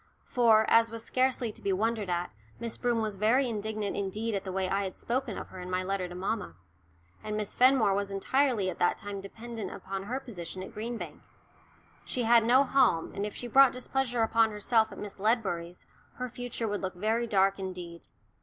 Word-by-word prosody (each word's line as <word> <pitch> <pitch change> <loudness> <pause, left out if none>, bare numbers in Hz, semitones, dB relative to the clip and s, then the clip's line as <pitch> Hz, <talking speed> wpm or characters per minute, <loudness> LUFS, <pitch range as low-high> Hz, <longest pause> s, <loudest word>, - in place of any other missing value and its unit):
For, 225 -3 +4
as 230 0 +5
was 230 0 -6
scarcely 255 -2 +1
to - - -10
be 200 - 0
wondered 215 +1 0
at, 175 0 -1 0.3
Miss 230 -1 -4
Broom 235 -2 0
was 210 -2 -3
very 240 +6 +3
indignant 215 -2 -3
indeed 210 +3 -2
at 195 -1 -2
the 190 - -5
way 190 0 0
I 195 +2 0
had 190 -1 -5
spoken 245 -3 -2
of - - -7
her 185 - -10
in 180 0 -7
my 185 0 0
letter 190 -1 -2
to 175 - -8
mamma. 190 - -3 0.7
And 215 0 -3
Miss 210 -2 -3
Fenmore 250 -5 +5
was 200 0 -1
entirely 225 +1 +1
at 170 - -10
that 175 - +2
time 205 -2 -6
dependent 220 0 -7
upon 195 0 -6
her 250 +5 -2
position 185 -8 -6
at - - -10
Green 230 +2 -4
Bank. - - -8 0.8
She 250 - -2
had 230 0 +6
no 250 +4 +5
home, 260 -12 +2
and 200 +1 -2
if 210 - -8
she - - -6
brought 270 +2 +6
displeasure 250 -2 -1
upon 225 0 +3
herself 220 +1 +1
at - - -10
Miss 205 -1 -7
Ledbury's 190 -6 -1 0.3
her 250 0 -4
future 240 -1 -4
would 205 -1 -2
look 190 -1 -3
very 220 +5 0
dark 195 -2 +3
indeed. 180 -3 -6
215 Hz, 205 wpm, -29 LUFS, 195-235 Hz, 0.8 s, had